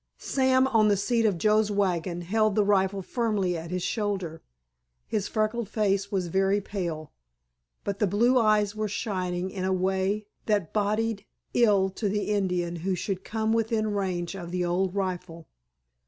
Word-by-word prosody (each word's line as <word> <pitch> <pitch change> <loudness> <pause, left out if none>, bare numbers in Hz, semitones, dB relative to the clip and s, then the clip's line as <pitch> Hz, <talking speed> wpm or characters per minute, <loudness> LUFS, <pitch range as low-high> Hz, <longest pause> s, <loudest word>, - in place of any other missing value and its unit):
Sam 260 -1 +2
on 220 -4 +4
the 205 -1 +3
seat 230 +3 +2
of 195 -5 0
Joe's 215 +4 +3
wagon 180 -4 0
held 215 +3 +1
the 210 - +4
rifle 195 -1 +2
firmly 210 -6 0
at 165 0 -6
his 180 0 -2
shoulder. 195 -7 -2 0.6
His 205 -2 -2
freckled 215 0 -1
face 200 -2 0
was 190 -3 0
very 195 +3 +2
pale, 170 -7 -4 0.7
but 200 0 -3
the 210 - +3
blue 235 +7 +3
eyes 215 -2 +3
were 215 0 -1
shining 185 -3 -2
in 185 -1 -4
a 190 - +1
way 190 +3 0 0.2
that 205 -7 0
boded 215 +1 0 0.3
ill 200 -5 +4
to 205 +2 -2
the 210 +1 -1
Indian 180 -4 0
who 185 +3 -1
should 190 +1 -3
come 220 0 -1
within 220 -1 0
range 185 -3 -2
of 175 -3 -7
the 180 0 -1
old 180 +2 0
rifle. 180 -4 -3
200 Hz, 165 wpm, -27 LUFS, 185-215 Hz, 0.7 s, on